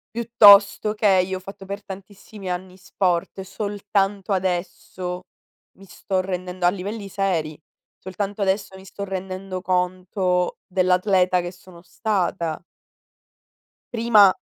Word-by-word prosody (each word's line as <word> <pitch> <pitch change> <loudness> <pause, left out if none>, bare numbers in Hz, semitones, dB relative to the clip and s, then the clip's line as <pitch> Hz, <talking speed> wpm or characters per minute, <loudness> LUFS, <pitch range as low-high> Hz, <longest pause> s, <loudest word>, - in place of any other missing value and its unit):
piuttosto 210 -2 +6
che 195 -4 +4
io 190 0 -3
ho - - -8
fatto 195 +1 -11
per 200 +1 -6
tantissimi 195 0 -10
anni 180 +1 -5
sport, 185 -1 -1
e 190 - -4
soltanto 200 0 -2
adesso 180 0 -3 0.5
mi 195 - -15
sto 190 0 -3
rendendo 180 -1 -4
a - - +7
livelli 200 +3 -5
seri, 180 -6 -1 0.4
soltanto 200 +2 -5
adesso 195 0 0
mi 190 0 -13
sto 200 +1 -7
rendendo 190 -1 -5
conto 180 0 0
dell'atleta 185 0 +2
che 175 0 -5
sono 180 -1 -16
stata 180 -5 -1 1.3
prima 225 -5 +6
190 Hz, 120 wpm, -23 LUFS, 180-200 Hz, 1.3 s, a